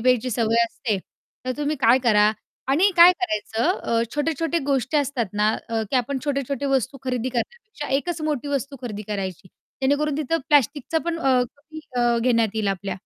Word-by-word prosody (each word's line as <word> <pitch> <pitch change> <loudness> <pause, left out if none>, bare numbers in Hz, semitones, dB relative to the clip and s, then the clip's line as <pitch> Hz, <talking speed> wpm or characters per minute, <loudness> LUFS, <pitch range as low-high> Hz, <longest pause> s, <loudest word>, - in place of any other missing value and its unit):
प्यायची 250 +1 +2
सवय 230 0 +2
असते, 225 -3 -3 0.5
तर 255 - -1
तुम्ही 295 +1 -1
काय 245 +2 +5
करा 210 -2 +5 0.4
आणि 345 +9 +4
काय 345 +2 +9
करायचं 230 - 0
अ, 230 0 0
छोट्या-छोट्या 325 +2 0
गोष्टी 275 +1 0
असतात 270 -5 0
ना, 210 +1 +2 0.2
अ, 225 -1 -1
की 265 - +2
आपण 260 +3 0
छोटे-छोटे 280 -1 -2
वस्तू 270 0 0
खरेदी 250 -1 -1
करण्यापेक्षा 395 - -5
1 340 +5 -2
च - - -11
मोठी 295 -2 -2
वस्तू 275 0 -2
खरेदी 215 -4 -5
करायची. 190 -3 -4 0.3
जेणेकरून 285 +2 +1
तिथं 310 +2 0
प्लास्टिकचा 290 +2 +2
पण 340 -1 -2
अ, 265 -5 +3 0.2
कमी 310 +2 -11 0.2
अ, 240 -1 +3
घेण्यात 230 -3 +3
येईल 215 -2 0
आपल्या. 195 0 -2
260 Hz, 175 wpm, -23 LUFS, 230-295 Hz, 0.5 s, काय